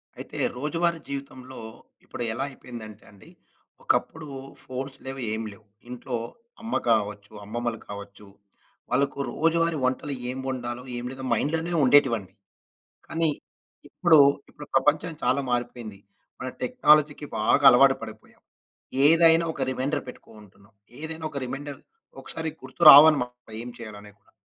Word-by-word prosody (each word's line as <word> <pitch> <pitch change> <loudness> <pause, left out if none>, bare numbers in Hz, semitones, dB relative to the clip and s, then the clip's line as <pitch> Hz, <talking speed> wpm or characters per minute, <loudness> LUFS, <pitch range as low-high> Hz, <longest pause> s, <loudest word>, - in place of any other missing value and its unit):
అయితే, - - -9 0.2
రోజువారీ 165 +4 0
జీవితంలో, 130 -2 -7 0.4
ఇప్పుడు 120 - -6
ఎలా 125 +4 -3
అయిపోయిందంటే 115 -5 -11
అండి, 100 - -17 0.5
ఒకప్పుడు 160 -1 -1 0.4
ఫోన్స్ 130 +1 -6
లేవు, 135 0 -5
ఏం 110 - -3
లేవు. 105 +1 -17 0.2
ఇంట్లో 125 0 -5 0.5
అమ్మ 230 +1 -4
కావచ్చు, 105 -2 0
అమ్మమ్మలు 120 +1 -3
కావచ్చు 100 0 -9 0.6
వాళ్ళకు 140 +2 0
రోజువారీ 165 0 +1
వంటలు 130 +3 -1 0.2
ఏం 130 - -4
వండాలో, 125 -1 -4
ఏం 120 - -5
లేదో, 135 0 -8
మైండ్‌లోనే 160 +8 -1
ఉండేటివండి. 125 -7 +3 0.7
కానీ, 165 0 0 0.6
ఇప్పుడు, 170 -3 +4 0.3
ఇప్పుడు 150 - -11
ప్రపంచం 150 +5 +2
చాలా 130 +3 +2
మారిపోయింది. 120 -4 -3 0.4
మన 130 - -4
టెక్నాలజీకి 150 - +3
బాగా - - +2
అలవాటు - - +5
పడిపోయాం. - - -11 0.7
ఏదైనా 165 +1 +5
ఒక - - -7
రిమైండర్ 130 +3 -2
పెట్టుకూంటున్నాం. 105 -3 -15 0.3
ఏదేనా 160 +1 -5
ఒక 140 - -3
రిమైండర్ 140 +2 -6 0.4
ఒకసారి 160 0 -2
గుర్తు 130 +5 -13
రావనమాట 135 -5 +6
ఏం 120 - -7
చేయాలనేది 105 -2 -10
కూడా. - - -31
130 Hz, 125 wpm, -25 LUFS, 120-155 Hz, 0.7 s, రావనమాట